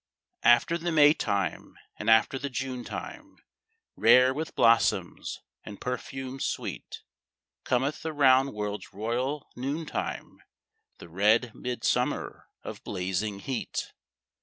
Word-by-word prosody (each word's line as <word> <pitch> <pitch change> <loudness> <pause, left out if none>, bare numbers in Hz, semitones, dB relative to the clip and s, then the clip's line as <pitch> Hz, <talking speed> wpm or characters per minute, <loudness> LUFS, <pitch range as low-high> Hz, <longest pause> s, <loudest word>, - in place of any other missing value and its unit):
After 120 +8 +4
the 175 +1 -2
May 150 -2 +6
time, 100 - -2 0.2
and - - -1
after 110 +4 +4
the 140 - -4
June 130 -1 -4
time - - -8 0.6
Rare 130 +1 +6
with 155 +3 -5
blossoms 115 0 +2 0.2
and 105 -1 -9
perfumes 130 +1 -5
sweet, - - -5 0.6
Cometh 130 +4 0
the 160 - -3
round 135 -2 +4
world's 105 -1 -5
royal 125 +7 -2
noon 140 +6 -3
time, - - -5 0.6
The - - -12
red 105 +7 +2
midsummer 125 -1 -2 0.2
of - - -8
blazing 95 +2 -3
heat. 130 +1 -4
125 Hz, 115 wpm, -28 LUFS, 110-140 Hz, 0.6 s, May